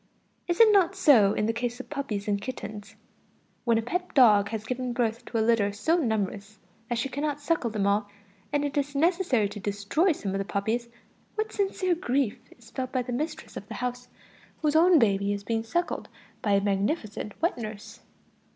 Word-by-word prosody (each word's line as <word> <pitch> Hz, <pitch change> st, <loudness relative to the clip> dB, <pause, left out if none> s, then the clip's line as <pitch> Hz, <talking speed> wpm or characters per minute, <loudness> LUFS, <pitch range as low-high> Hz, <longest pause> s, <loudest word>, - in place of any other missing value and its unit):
Is 345 Hz, 0 st, -1 dB
it 450 Hz, -2 st, +8 dB
not 390 Hz, -2 st, +4 dB
so 235 Hz, -, +5 dB
in 210 Hz, -, 0 dB
the 225 Hz, -, +1 dB
case 240 Hz, +1 st, -3 dB
of 260 Hz, -, -9 dB
puppies 235 Hz, -9 st, -3 dB
and 200 Hz, -1 st, 0 dB
kittens? 215 Hz, -3 st, -7 dB, 0.7 s
When 230 Hz, -2 st, +3 dB
a 225 Hz, -, 0 dB
pet 360 Hz, +9 st, -3 dB
dog 210 Hz, -7 st, +6 dB
has 220 Hz, -1 st, -4 dB
given 255 Hz, +1 st, -3 dB
birth 235 Hz, 0 st, -1 dB
to 235 Hz, -, -3 dB
a 220 Hz, -, +2 dB
litter 225 Hz, -3 st, +3 dB
so 265 Hz, +11 st, +1 dB
numerous 215 Hz, -, -2 dB, 0.3 s
that 240 Hz, -, 0 dB
she 235 Hz, -, 0 dB
cannot 290 Hz, +2 st, -2 dB
suckle 290 Hz, -5 st, 0 dB
them 210 Hz, -2 st, -1 dB
all, 205 Hz, +1 st, +1 dB, 0.4 s
and 290 Hz, 0 st, +1 dB
it 285 Hz, -, -3 dB
is 285 Hz, 0 st, -1 dB
necessary 320 Hz, -, +2 dB
to 205 Hz, +1 st, -8 dB
destroy 205 Hz, -, +1 dB
some 200 Hz, -10 st, -3 dB
of 195 Hz, -, -1 dB
the -, -, 0 dB
puppies, 220 Hz, +5 st, -2 dB, 0.5 s
what 435 Hz, 0 st, -2 dB
sincere 385 Hz, -2 st, 0 dB
grief 275 Hz, -, 0 dB, 0.2 s
is 230 Hz, -1 st, -18 dB
felt 255 Hz, +1 st, -4 dB
by 255 Hz, -2 st, 0 dB
the 245 Hz, 0 st, -5 dB
mistress 305 Hz, +5 st, -4 dB
of 205 Hz, -, -7 dB
the -, -, -7 dB
house, 245 Hz, 0 st, -4 dB, 0.6 s
whose 300 Hz, 0 st, +2 dB
own 345 Hz, +2 st, +6 dB
baby 200 Hz, -5 st, +2 dB
is 200 Hz, 0 st, -5 dB
being 225 Hz, +2 st, -1 dB
suckled 345 Hz, +10 st, -2 dB, 0.3 s
by 205 Hz, -, +1 dB
a 200 Hz, -, +4 dB
magnificent 205 Hz, -, -2 dB
wet 335 Hz, -6 st, 0 dB
nurse! 215 Hz, -2 st, -8 dB
235 Hz, 195 wpm, -27 LUFS, 210-290 Hz, 0.7 s, it